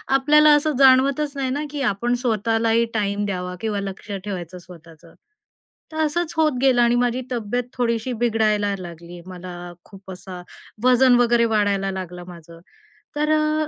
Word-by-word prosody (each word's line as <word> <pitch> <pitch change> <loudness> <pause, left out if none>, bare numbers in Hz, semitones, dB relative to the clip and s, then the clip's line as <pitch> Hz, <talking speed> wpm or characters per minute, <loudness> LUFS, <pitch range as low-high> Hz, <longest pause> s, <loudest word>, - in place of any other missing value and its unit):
आपल्याला 300 +3 +5
असं 300 +1 0
जाणवतच 275 +2 +4
नाही 265 -1 -1
ना 290 +3 -2
की 290 -2 -4
आपण 240 +1 0
स्वतःलाही 225 0 +1
टाईम 205 -1 -1
द्यावा 180 -2 -4
किंवा 215 -2 -2
लक्ष 195 +1 -7
ठेवायचं 180 -3 -6
स्वतःचं. 165 -2 -16 0.8
तर 315 - -8
असंच 335 +2 -2
होत 310 -3 +3
गेलं 260 -3 +4
आणि 240 0 +3
माझी 245 +1 0
तब्येत 240 +1 -2
थोडीशी 235 0 -1
बिघडायला 215 -3 0
लागली, 170 0 -10
मला 175 -1 -9
खूप 195 -1 -13
असा 180 -1 -9 0.4
वजन 255 0 +5
वगैरे 235 -1 +3
वाढायला 200 -2 +1
लागलं 180 -2 -7
माझं, 170 -1 -13 0.6
तर 300 +1 0
अ, 305 0 +1
225 Hz, 150 wpm, -21 LUFS, 185-260 Hz, 0.8 s, आपल्याला